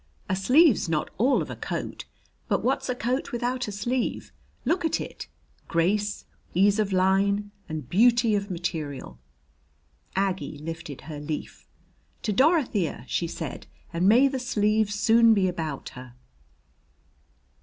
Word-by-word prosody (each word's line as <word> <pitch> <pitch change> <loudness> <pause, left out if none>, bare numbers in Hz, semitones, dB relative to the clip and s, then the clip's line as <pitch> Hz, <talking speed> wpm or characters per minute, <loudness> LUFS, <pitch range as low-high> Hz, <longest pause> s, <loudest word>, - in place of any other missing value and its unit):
A 185 - 0
sleeve's 250 - +4
not 155 -2 -1
all 260 +5 +3
of - - -8
a - - -5
coat, - - -5 0.4
but - - 0
what's - - 0
a 250 - 0
coat 250 +3 -2
without 245 +1 -2
a - - -4
sleeve? 240 +5 -2 0.3
Look 355 +1 +1
at 325 -1 +1
it - - -7 0.4
grace, 205 +5 0 0.3
ease 200 +3 +4
of 205 -2 +1
line, 195 +2 +2 0.2
and 155 -5 -5
beauty 230 - +4
of 200 0 -1
material." 155 - -4 1.0
Aggie 190 -5 -1
lifted 155 -2 -7
her 155 -2 -7
leaf. 150 +1 -6 0.6
"To 215 - 0
Dorothea!" 250 - +2
she 170 - -1
said. 160 -2 -6 0.3
"And 175 +3 +3
may 250 +6 +6
the 270 -1 -2
sleeve 215 -3 +1
soon 225 +2 +5
be 190 -2 +2
about 160 -6 -4
her." 125 -1 -12
200 Hz, 140 wpm, -26 LUFS, 165-235 Hz, 1.0 s, may